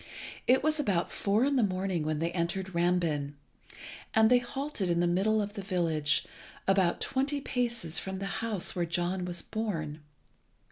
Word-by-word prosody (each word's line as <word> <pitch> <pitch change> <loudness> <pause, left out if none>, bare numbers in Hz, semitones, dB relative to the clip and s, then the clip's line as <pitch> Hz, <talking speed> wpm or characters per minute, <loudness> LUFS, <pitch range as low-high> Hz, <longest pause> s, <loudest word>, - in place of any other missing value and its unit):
It 260 +2 +5
was 310 0 +2
about 195 -11 0
four 210 +5 +2
in 280 -1 +2
the - - +4
morning 185 -3 0
when 155 0 -1
they 165 +2 -1
entered 180 +2 -2
Rambin, 170 -5 +1 0.8
and 220 +1 +5
they 250 - +7
halted 245 -5 -3
in 170 0 +2
the 175 - +3
middle 205 +5 +2
of 205 0 -6
the 205 - -5
village, 165 -6 +1 0.4
about 190 -3 +3
twenty 275 +2 0
paces 240 - -1
from 190 0 -5
the 195 - -4 0.2
house 220 -5 -1
where 175 -1 0
John 175 +2 -1
was 175 -2 -4
born. 165 -9 -3
190 Hz, 170 wpm, -30 LUFS, 170-220 Hz, 0.8 s, they